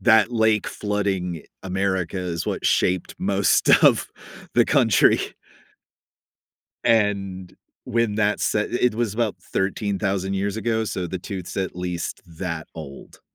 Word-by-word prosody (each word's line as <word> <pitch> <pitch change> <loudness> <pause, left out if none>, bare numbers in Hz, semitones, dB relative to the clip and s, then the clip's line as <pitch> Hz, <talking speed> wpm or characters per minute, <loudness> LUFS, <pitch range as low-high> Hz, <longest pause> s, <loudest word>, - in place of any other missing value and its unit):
that 110 0 +5
lake 110 -2 +2
flooding 95 -5 -2 0.2
America 95 -1 -1
is 85 -2 -3
what - - -2
shaped 90 -1 +1
most - - +2 0.2
of - - +5 0.5
the - - +5
country. - - +4 1.6
And 100 -4 +1 0.3
when 115 -2 0
that 105 -1 +2
se 105 - +1
it 125 -1 +1
was 115 -3 -1
about 110 -4 0
13,000 95 0 -1
years 100 +2 -1
ago, 110 0 0
so 95 -4 -3
the 95 +2 -4
tooth's 90 0 -7
at 95 -3 -2
least 90 -2 -4
that 85 -1 -5
old. 75 -4 -10
95 Hz, 125 wpm, -23 LUFS, 90-105 Hz, 1.6 s, that